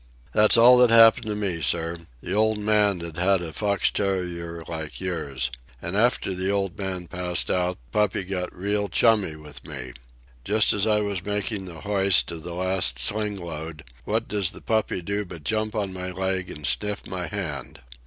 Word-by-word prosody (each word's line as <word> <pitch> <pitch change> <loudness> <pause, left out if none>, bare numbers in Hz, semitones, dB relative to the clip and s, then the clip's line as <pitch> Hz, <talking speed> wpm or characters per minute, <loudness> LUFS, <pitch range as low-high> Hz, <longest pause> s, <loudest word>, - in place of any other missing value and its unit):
"That's 105 +2 +6
all 125 +2 +8
that 125 -1 +6
happened 115 0 +7
to 105 - -2
me, 95 -5 -3
sir. 85 +1 -1 0.2
The - - -4
old 110 +1 +2
man'd 105 -4 +2
had 95 0 +2
a 80 -2 -7
fox 100 +3 0
terrier 90 -4 -3
like 80 -3 -6
yours. 70 -8 -3 0.3
And 85 +3 -4
after 110 -3 +2
the 95 +1 -2
old 100 -2 -1
man 95 -3 -4
passed 90 0 +1
out 90 0 0
the - - -5
puppy 105 -2 +1
got 90 -1 -4
real, 100 +2 -2
chummy 105 -5 +2
with 75 -2 -10
me. 65 -4 -7 0.5
Just 105 +1 +3
as 105 +1 +1
I 105 -1 +2
was 100 -3 -3
making 105 0 -2
the 85 -3 -9
hoist 100 -3 +3
of 85 -1 -7
the 85 +1 -7
last 95 -8 +1
sling 105 +10 0
load, 80 -2 -7 0.2
what 110 +2 -1
does 100 -4 0
the - - -12
puppy 110 -5 -1
do 100 +3 -2
but 85 -5 -11
jump 110 +6 -1
on 100 -3 -2
my 90 0 -5
leg 95 0 -2
and 75 - -7
sniff 105 +6 -2
my 90 -1 -4
hand. 75 -12 -5
95 Hz, 185 wpm, -24 LUFS, 85-105 Hz, 0.5 s, all